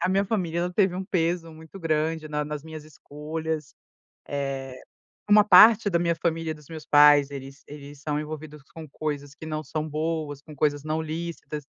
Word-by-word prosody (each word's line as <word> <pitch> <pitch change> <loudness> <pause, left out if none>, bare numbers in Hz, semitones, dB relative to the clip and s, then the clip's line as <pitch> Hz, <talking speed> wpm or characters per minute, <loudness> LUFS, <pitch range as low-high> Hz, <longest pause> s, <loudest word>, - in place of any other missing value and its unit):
a - - +1
minha 195 +1 +2
família 185 -5 -1
ela 180 +1 -2
teve 190 -1 +2
um 190 - -4
peso 170 -2 -1
muito 160 +4 -12
grande 155 -1 -1
na 150 0 -2
nas 150 -1 -5
minhas 155 -1 -9
escolhas. 155 0 -6 1.6
Eh, - - -2
uma 210 0 +8
parte 215 0 +7
da 170 - +2
minha 170 -1 +1
família 165 -1 -2
dos 150 -2 -17
meus 160 -2 -8
pais, 145 -1 +6
eles 135 0 -9
eles 145 -1 -11
são 150 -1 -2
envolvidos 150 0 -7
com 160 -1 -8
coisas 145 -1 -4
que 160 - -10
não 155 0 -3
são 155 +2 -4
boas, 155 -1 -3
com 150 +1 -13
coisas 145 0 0
não 155 +1 -1
lícitas, 160 -1 -5
155 Hz, 185 wpm, -25 LUFS, 150-165 Hz, 1.6 s, uma